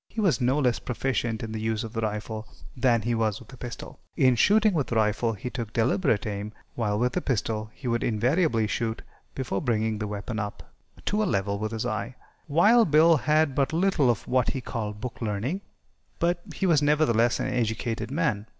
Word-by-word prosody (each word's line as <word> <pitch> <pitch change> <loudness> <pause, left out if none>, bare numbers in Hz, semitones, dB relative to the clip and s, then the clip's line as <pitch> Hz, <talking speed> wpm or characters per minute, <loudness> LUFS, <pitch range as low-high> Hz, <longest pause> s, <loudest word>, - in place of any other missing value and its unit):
He 225 - -6
was 185 -10 +2
no 130 +3 +2
less 125 -6 +2
proficient 120 -2 -2
in 110 - -5
the 110 0 -4
use 110 -1 -1
of 110 0 -7
the 115 - -2
rifle 110 0 -4 0.3
than 120 -3 +2
he 120 +2 0
was 110 -3 0
with 120 +2 -15
a - - -11
pistol. 120 0 -8 0.2
In 130 -1 +5
shooting 210 - +4
with 145 -7 -1
a - - 0
rifle 110 +1 +1
he 115 +4 -6
took 115 -5 -5
deliberate 115 - +1
aim, 105 0 -4 0.2
while 105 -3 -1
with 125 +2 0
a - - +1
pistol 110 -3 -1
he 130 - -8
would 120 0 0
invariably 120 - +2
shoot 110 +1 -2 0.3
before 120 -7 -2
bringing 110 -4 0
the 105 - -2
weapon 105 +2 -4
up 105 -1 -5 0.4
to 210 +1 +1
a - - +2
level 100 - 0
with 110 +1 -3
his 110 -1 -3
eye. 110 +4 -3 0.3
Wild 210 +8 +5
Bill 160 +3 +6
had 155 0 +2
but 135 +2 0
little 170 -6 +2
of 120 0 -1
what 125 -2 +2
he 135 - -2
called 105 -4 -5
"book 125 0 -6
learning," 115 - -2 0.6
but 175 +1 +1
he 195 - -1
was, 165 -5 +4
nevertheless, 145 -6 +3
an - - -1
educated 115 -2 -1
man. 125 - -1
120 Hz, 205 wpm, -26 LUFS, 110-145 Hz, 0.6 s, Bill